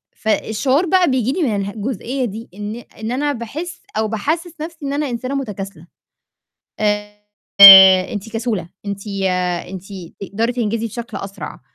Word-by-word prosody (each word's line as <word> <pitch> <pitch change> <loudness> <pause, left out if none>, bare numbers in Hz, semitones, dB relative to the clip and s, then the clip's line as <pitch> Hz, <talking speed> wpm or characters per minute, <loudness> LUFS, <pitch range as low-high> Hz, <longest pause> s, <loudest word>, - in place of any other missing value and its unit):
فالشعور 255 - 0
بقى 360 -4 +3
بييجي 255 -1 0
لي 360 - -2
من 225 -7 0
اله 200 0 -3
جُزئية 250 +4 -3
دي 225 +1 -7
إن 210 +2 -6 0.2
إن 220 +2 -4
أنا 290 +3 -1
باحس 285 +10 -7 0.2
أو 220 - +1
باحسس 315 - -3
نفسي 320 -2 -7
إن 275 - -3
أنا 290 -1 -2
إنسانة 255 +3 -4
مُتكاسلة. 195 - -6 0.9
آآ، 210 0 -1 1.0
أنتِ 210 +1 -6
كسولة، 225 -7 -3 0.2
أنتِ 200 +1 -5 0.6
أنتِ 190 0 -8 0.4
تقدري 220 +5 -2
تنجزي 230 -1 -2
بشكل 235 +2 -7
أسرع، 195 -1 -8
230 Hz, 145 wpm, -18 LUFS, 210-275 Hz, 1.0 s, بقى